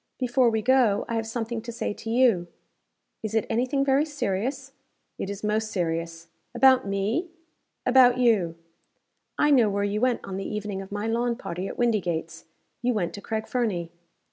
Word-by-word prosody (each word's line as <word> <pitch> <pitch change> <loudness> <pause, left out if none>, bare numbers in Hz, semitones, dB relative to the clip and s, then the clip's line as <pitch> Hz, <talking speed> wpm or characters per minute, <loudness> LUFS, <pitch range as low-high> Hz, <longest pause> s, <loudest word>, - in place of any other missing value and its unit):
Before 250 -1 +2
we 220 -1 -1
go, 245 -4 +3
I - - -4
have 225 -1 -1
something 230 0 -3
to 235 +1 -7
say 230 -2 -3
to 225 - -8
you." 230 -7 +3 0.7
"Is 220 0 -4
it 220 - +2
any 240 +3 +1
thing 275 +1 0
very 275 +1 +3
serious?" 270 -1 -3 0.5
"It 195 - -3
is 200 +1 -6
most 215 +1 0
serious." 165 -2 -3 0.3
"About 260 -2 +5
me?" 205 - -1 0.6
"About 250 -1 +6
you. 215 -9 +2 0.8
I 295 - +3
know 240 -6 +5
where 200 0 -1
you 205 +1 -1
went 250 -1 +2
on 190 -1 -5
the 195 - -4
evening 205 -2 -4
of 195 - -11
my 205 +1 -3
lawn 235 +1 0
party 185 -5 -5
at - - -7
Windygates 175 -8 -1 0.4
you 245 -1 +1
went 180 -5 -1
to 200 - -8
Craig 220 +1 -3
Fernie." 195 -9 -1
220 Hz, 180 wpm, -26 LUFS, 195-250 Hz, 0.8 s, About